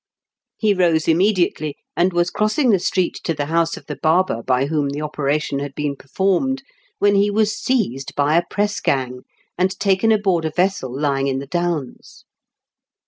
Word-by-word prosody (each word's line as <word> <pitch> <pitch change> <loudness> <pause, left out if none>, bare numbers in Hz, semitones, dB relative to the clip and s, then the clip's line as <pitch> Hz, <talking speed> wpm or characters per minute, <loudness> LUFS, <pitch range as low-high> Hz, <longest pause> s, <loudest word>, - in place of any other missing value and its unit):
He 215 -2 +2
rose 170 -4 +2
imme 180 +6 +4
diately, 170 -6 -1 0.2
and 180 +2 +2
was 175 0 +1
crossing 215 +5 +2
the 195 - +3
street 180 0 -1
to 165 - -1
the 145 - -2
house 165 +2 0
of - - -12
the 150 - -6
barber 160 -5 +1
by 130 +2 +1
whom 145 -1 -1
the 145 +2 -4
operation 150 -1 -1
had 140 -1 -6
been 145 -1 -2
performed, 195 - -1 0.3
when 205 0 +3
he 200 +1 +3
was 215 +1 +1
seized 190 - -1
by 145 +2 +2
a 170 - +5
press 205 0 -1
gang, 125 -2 -1 0.3
and 190 +1 0
taken 200 +2 +2
aboard 195 -6 +2
a - - 0
vessel 180 -8 0
lying 140 0 0
in 135 -1 -1
the 135 - -5
Downs. 170 -3 -4
170 Hz, 180 wpm, -20 LUFS, 145-195 Hz, 0.3 s, a